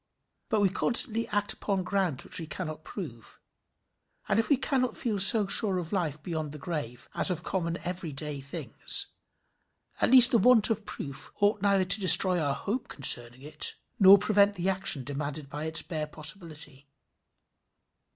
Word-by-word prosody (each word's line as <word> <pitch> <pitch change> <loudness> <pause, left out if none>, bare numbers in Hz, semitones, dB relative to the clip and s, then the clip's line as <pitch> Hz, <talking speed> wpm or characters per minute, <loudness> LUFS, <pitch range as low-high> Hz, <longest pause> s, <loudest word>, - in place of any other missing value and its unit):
But 220 -4 -1
we 200 - +2
constantly 230 +3 +2
act 205 -1 0
upon 195 -2 -4
grounds 185 -8 -3
which - - -3
we 165 - -8
cannot 155 -1 -8
prove, 130 - -11 0.9
and 195 - 0
if 225 - -2
we 285 - +2
cannot 255 -3 -3
feel 215 -4 -4
so 205 +2 +5
sure 195 -1 +2
of 175 +1 -7
life 155 -6 -4
beyond 155 -4 -6
the - - -9
grave 140 -6 -7
as - - +2
of 175 -2 -5
common 170 -2 -4
every 175 -2 -6
day 145 0 -4
things, 140 - -2 0.9
at - - +1
least 250 -1 +6
the 235 - +2
want 225 0 +4
of 215 -1 -5
proof 140 -1 -9
ought 205 0 0
neither 200 -2 +1
to 185 +3 +1
destroy 185 -2 +8
our 140 -2 -2
hope 230 - -5
concerning 125 -2 +3
it, 150 +1 0 0.2
nor 195 0 +7
prevent 205 0 +1
the 185 +1 -2
action 190 -8 -1
demanded 145 +1 -7
by 150 +1 -7
its 160 0 0
bare 155 -3 -5
possibility. 155 -3 -7
180 Hz, 170 wpm, -26 LUFS, 150-205 Hz, 0.9 s, destroy